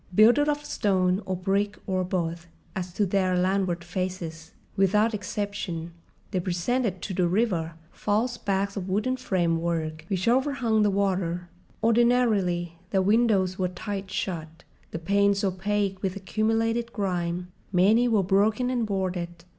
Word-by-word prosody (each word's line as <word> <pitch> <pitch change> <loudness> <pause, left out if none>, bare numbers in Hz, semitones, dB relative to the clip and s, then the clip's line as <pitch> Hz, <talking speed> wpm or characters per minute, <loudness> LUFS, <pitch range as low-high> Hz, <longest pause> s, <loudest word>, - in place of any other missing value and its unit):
Builded 240 +8 +6
of 295 0 -1
stone 185 -4 +1
or 190 - -1
brick 200 +3 0
or 185 -1 0
both 170 -2 -2 0.3
as 180 -1 -4
to 205 - +1
their 185 -1 +1
landward 185 -2 +1
faces, 175 -2 -4 0.2
without 210 +4 +3
exception 200 -4 -4 0.4
they 185 - 0
presented 185 +3 -1
to 195 - -3
the 180 -1 +2
river 175 -4 0 0.2
false 225 +4 0
backs 200 -2 -1
of 195 -2 -4
wooden 215 +7 +1
framework 165 -7 -1
which 190 0 -1
overhung 250 -3 +2
the 210 - +4
water. 185 -3 -1 0.3
Ordinarily, 220 -8 +2
their 190 -2 +2
windows 200 -3 +2
were 185 - +2
tight 195 +2 -5
shut, 165 -4 -4 0.3
the - - -5
panes 200 +4 +2
opaque 195 0 -1
with 190 -1 -2
accumulated 225 +4 0
grime—many 180 +3 +1
were 220 -4 +3
broken 210 +6 +2
and 240 -3 0
boarded. 180 -3 -3
195 Hz, 135 wpm, -26 LUFS, 180-215 Hz, 0.4 s, Builded